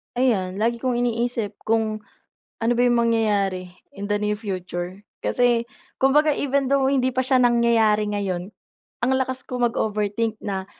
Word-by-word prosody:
Ayan, 205 -6 0
lagi 235 +1 +1
kong 255 +1 -1
iniisip 235 -3 -1
kung, 220 -1 +1 0.6
ano 230 +1 +1
ba 240 - +2
yung 240 -1 +3
mangyayari 200 -5 0 0.2
in 200 +1 -6
the 205 - +2
near 210 0 0
future. 185 -2 -5 0.2
Kasi, 240 -1 +2 0.3
kumbaga 295 +3 +3
even 280 -1 0
though 270 0 +2
hindi 260 -2 +1
pa 260 - +2
siya 260 0 +3
nangyayari 230 -3 +3
ngayon, 195 -2 -3 0.5
ang 245 - 0
lakas 260 0 -2
kong 245 -2 0
mag-overthink 215 0 -1
na, 190 -2 -3
230 Hz, 150 wpm, -23 LUFS, 205-250 Hz, 0.6 s, yung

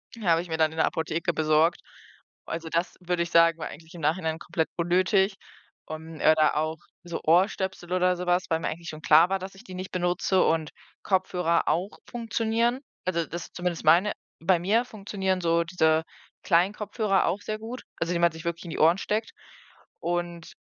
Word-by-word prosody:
Die 225 - -10
habe 165 0 +4
ich 175 - -10
mir 160 - -2
dann 160 -1 +3
in 160 - -11
der - - +4
Apotheke 160 +1 -1
besorgt. 155 +2 +2 0.6
Also, 165 0 -5
das, 170 +2 -1
würde 175 -1 -1
ich 170 - -7
sagen, 165 0 +5
war - - -4
eigentlich 160 +2 -12
im 165 - -9
Nachhinein 160 +1 0
komplett 165 -1 -2
unnötig. 185 +3 +2 0.5
Ähm, 160 +1 -7
oder 155 -1 +4
auch 155 +1 -1 0.2
so 170 -1 -5
Ohrstöpsel 185 +1 +1
oder 180 0 +3
sowas, 180 0 +1
weil 160 0 +1
mir - - -3
eigentlich 170 +1 -5
schon 155 0 -8
klar 160 +4 +6
war, 195 0 0
dass 190 +1 -8
ich 195 - -14
die 185 - -11
nicht 185 +1 -6
benutze 180 +1 +1
und 160 -2 +1 0.3
Kopfhörer 180 -3 +1
auch 185 +5 -1
funktionieren, 235 +1 0 0.2
also, 170 -2 0
das 170 +2 -7
zumindest 175 -2 -3
meine. 175 +7 +5 0.3
Bei 185 +1 +4
mir 215 +7 +2
funktionieren 195 -4 -2
so 170 0 +2
diese 160 -2 +2 0.4
kleinen 180 +3 +3
Kopfhörer 210 -2 0
auch 185 +4 -1
sehr 215 +1 -4
gut, 235 +3 -7 0.2
also, 165 +1 -1
die 170 - 0
man 170 -1 +4
sich 160 0 -10
wirklich 170 +1 -3
in 165 - -6
die - - -5
Ohren 165 +3 +5
steckt. 215 +3 -2 0.7
Und 175 -1 -3
175 Hz, 190 wpm, -26 LUFS, 165-190 Hz, 0.7 s, klar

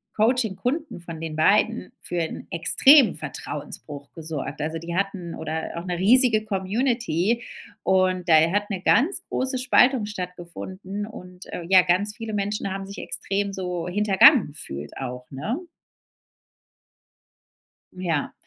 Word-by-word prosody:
Coaching-Kunden 245 - 0
von 170 -2 -8
den 160 -1 -5
beiden 215 +8 +2
für 175 - -3
'n 160 - -5
extremen 265 - +5
Vertrauensbruch 145 -2 -6
gesorgt. 155 -3 -6
Also, 160 +2 -2
die 170 +1 -6
hatten 195 -3 -2
oder 160 0 -4
auch 170 - -5
'ne 180 -1 -2
riesige 220 +3 +4
Community 215 - 0 0.4
und 185 -1 +2
da 165 - +6 0.2
hat 205 +2 0
'ne 195 -4 -3
ganz 275 - +2
große 260 0 -1
Spaltung 250 -2 +4
stattgefunden. 185 +1 -6
Und, 180 -4 -11
äh, 175 - -4
ja 185 -1 +7
ganz 185 +4 +1
viele 225 -2 -6
Menschen 205 0 -2
haben 195 0 -5
sich 200 +1 -10
extrem 200 0 -2
so 180 -3 -4
hintergangen 205 - +5
gefühlt 75 - -7
auch 125 -1 -6
ne? 205 - -3 2.3
Ja. 170 -5 -2
190 Hz, 130 wpm, -24 LUFS, 170-220 Hz, 2.3 s, ja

